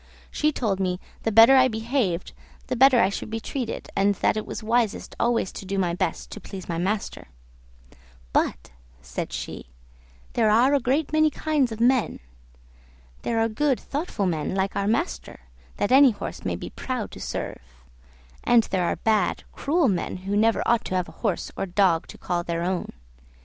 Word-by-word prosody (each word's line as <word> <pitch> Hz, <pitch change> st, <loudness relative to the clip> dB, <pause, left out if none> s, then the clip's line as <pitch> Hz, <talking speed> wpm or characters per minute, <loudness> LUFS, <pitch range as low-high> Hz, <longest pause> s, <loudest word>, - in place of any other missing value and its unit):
She 305 Hz, 0 st, +1 dB
told 215 Hz, -9 st, -1 dB
me 180 Hz, -1 st, -1 dB, 0.2 s
the 225 Hz, -, -1 dB
better 225 Hz, +5 st, +8 dB
I 260 Hz, -1 st, +6 dB
behaved 220 Hz, -6 st, -1 dB, 0.3 s
the -, -, -2 dB
better 260 Hz, 0 st, +6 dB
I 190 Hz, -, +4 dB
should 200 Hz, -, -5 dB
be 225 Hz, +1 st, -3 dB
treated, 240 Hz, +1 st, -4 dB
and 200 Hz, +1 st, +2 dB
that -, -, +1 dB
it 215 Hz, -, -4 dB
was -, -, -6 dB
wisest 225 Hz, -1 st, 0 dB
always 235 Hz, -5 st, +1 dB
to -, -, -8 dB
do 195 Hz, +1 st, -3 dB
my 180 Hz, -3 st, +1 dB
best 175 Hz, -, -3 dB
to 215 Hz, -, -8 dB
please 190 Hz, -3 st, -9 dB
my 165 Hz, -1 st, -2 dB
master; 195 Hz, -, -2 dB, 1.1 s
"but," -, -, 0 dB, 0.3 s
said -, -, -5 dB
she, -, -, -6 dB, 0.7 s
"there 220 Hz, -2 st, +3 dB
are 240 Hz, +6 st, +4 dB
a 285 Hz, -, +4 dB
great 275 Hz, +5 st, 0 dB
many 310 Hz, 0 st, +4 dB
kinds 300 Hz, -5 st, 0 dB
of 220 Hz, -, -6 dB
men; 245 Hz, 0 st, +2 dB, 1.0 s
there 230 Hz, -1 st, -1 dB
are 225 Hz, -, +3 dB
good 265 Hz, +4 st, 0 dB
thoughtful 285 Hz, -, -3 dB
men 165 Hz, 0 st, -1 dB
like 195 Hz, 0 st, -1 dB
our 200 Hz, -, 0 dB
master, 70 Hz, -, -2 dB, 0.4 s
that 205 Hz, -, 0 dB
any 270 Hz, +1 st, +8 dB
horse 210 Hz, -, -6 dB
may -, -, -1 dB
be -, -, -7 dB
proud 255 Hz, -4 st, -4 dB
to -, -, -10 dB
serve; -, -, -5 dB, 0.8 s
and 235 Hz, -2 st, +5 dB
there 185 Hz, -2 st, +1 dB
are -, -, 0 dB
bad, 215 Hz, -4 st, +1 dB
cruel 315 Hz, +1 st, +1 dB
men, 185 Hz, -4 st, -1 dB
who 200 Hz, +1 st, -1 dB
never 225 Hz, +2 st, +3 dB
ought 235 Hz, -1 st, +3 dB
to 185 Hz, -, -3 dB
have 180 Hz, -1 st, -1 dB
a -, -, -17 dB
horse 205 Hz, -7 st, -1 dB
or 195 Hz, -, -3 dB
dog 180 Hz, -3 st, +2 dB
to -, -, -11 dB
call 175 Hz, -1 st, -2 dB
their 170 Hz, 0 st, -2 dB
own. 180 Hz, 0 st, -2 dB
220 Hz, 185 wpm, -25 LUFS, 190-250 Hz, 1.1 s, better